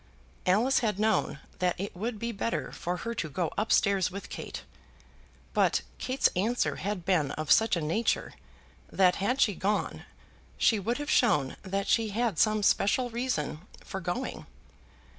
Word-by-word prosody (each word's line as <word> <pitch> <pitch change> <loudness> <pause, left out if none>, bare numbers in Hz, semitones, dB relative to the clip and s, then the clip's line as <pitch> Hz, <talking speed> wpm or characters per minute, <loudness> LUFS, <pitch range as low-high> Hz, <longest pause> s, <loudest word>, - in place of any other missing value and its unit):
Alice 225 +9 +4
had 215 -5 0
known 215 0 +1 0.2
that 180 -1 0
it 195 0 -4
would 220 +5 -3
be 235 +2 -3
better 230 +2 -2
for 180 +1 -3
her 230 +5 -4
to 170 -8 -3
go 165 +4 -2
up 215 +2 -1
stairs 195 -3 +3
with 195 +2 -8
Kate; - - -6 0.9
but - - +2 0.2
Kate's 260 +1 +2
answer 225 +7 0
had 195 -3 -3
been 175 -7 +2
of 155 -1 -3
such 225 -2 +5
a 170 - -2
nature 165 +10 0 0.6
that 185 -2 +4
had 225 +7 0
she 215 -6 +4
gone 205 +3 -1 0.5
she 220 - +3
would 230 +5 -1
have 290 0 -3
shown 150 - +3
that 195 +1 -3
she 225 -2 +2
had 220 -3 -1
some 215 -1 +3
special 240 +5 +2
reason 230 - -2 0.3
for 190 - -5
going. 180 +9 -4
205 Hz, 160 wpm, -29 LUFS, 180-230 Hz, 0.9 s, such